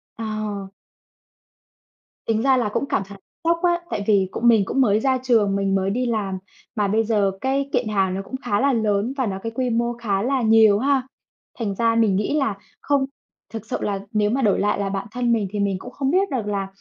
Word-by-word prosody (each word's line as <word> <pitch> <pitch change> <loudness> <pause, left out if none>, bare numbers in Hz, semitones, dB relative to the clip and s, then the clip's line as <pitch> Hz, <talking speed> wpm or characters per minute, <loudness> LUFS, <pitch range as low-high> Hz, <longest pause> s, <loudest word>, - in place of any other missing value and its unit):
Ờ. 225 - -6 2.0
Tính 225 0 +1
ra 265 0 +4
là 235 -4 0
cũng 235 +6 -1
cảm 195 - 0
thấy 200 0 -11 0.3
sốc 335 0 +2
á, 345 0 +3
tại 205 - -3
vì 195 -3 +3
cũng 240 - 0
mình 220 -4 +5
cũng 270 - 0
mới 215 -3 +3
ra 260 +1 +1
trường, 215 -6 +3
mình 195 -1 0
mới 195 0 0
đi 250 +5 -1
làm. 205 -5 -1 0.4
Mà 210 -3 +1
bây 220 +3 +2
giờ 205 -3 +1
cái 275 +1 0
kiện 245 -3 +1
hàng 195 -3 +1
nó 195 - -3
cũng 260 - -7
khá 205 -3 +1
là 275 0 +2
lớn 215 +2 0
và 260 - +1
nó 195 -3 -3
cái 225 - -3
quy 255 -1 0
mô 235 +1 0
khá 200 -5 -1
là 260 +2 0
nhiều 220 -2 +5
ha. 275 0 +2 0.6
Thành 205 -4 -2
ra 230 +2 +2
mình 220 -4 +3
nghĩ 210 +9 0
là 225 -9 0 0.2
không 280 -1 +1 0.5
thực 225 -1 -6
sự - - -3
là 200 -1 -1
nếu 210 -1 +2
mà 265 +4 0
đổi 210 -4 +2
lại 205 0 +1
là 200 - -1
bản 195 0 -4
thân 245 0 0
mình 215 -4 0
thì 205 - -3
mình 200 -2 0
cũng 245 - -10
không 275 +1 -1
biết 385 +1 +2
được 245 -5 -2
là 200 -2 -2
220 Hz, 230 wpm, -22 LUFS, 200-250 Hz, 2.0 s, mình